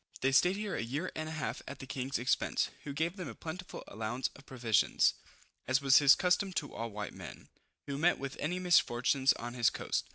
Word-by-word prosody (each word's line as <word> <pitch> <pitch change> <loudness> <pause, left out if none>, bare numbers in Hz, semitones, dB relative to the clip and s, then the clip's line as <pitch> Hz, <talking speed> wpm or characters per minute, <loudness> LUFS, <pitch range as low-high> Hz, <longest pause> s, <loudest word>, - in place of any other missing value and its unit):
They 135 - +2
stayed 180 +8 +4
here 210 -1 -4
a - - -2
year 140 +10 -3
and 155 0 -4
a - - -6
half 160 -2 -4
at 140 - -7
the 135 - -9
king's 135 0 -3
expense, 125 +2 0
who 145 - -4
gave 165 +6 -2
them 180 - -5
a - - -8
plentiful 180 +3 -7
allowance 110 +4 -3
of 140 - -16
provision, 120 -5 +1 0.7
as 130 +1 +3
was 140 -1 +6
his 140 -1 +7
custom 185 +1 +1
to 145 -4 -3
all 115 0 -4
white 105 -1 -6
men, - - -10 0.4
who 140 0 -4
met 175 +3 +3
with 135 0 -5
any 175 +5 -1
misfortune 135 -7 +2
on 120 +1 -6
his 120 -2 +3
coast. - - -3
140 Hz, 215 wpm, -32 LUFS, 125-170 Hz, 0.7 s, his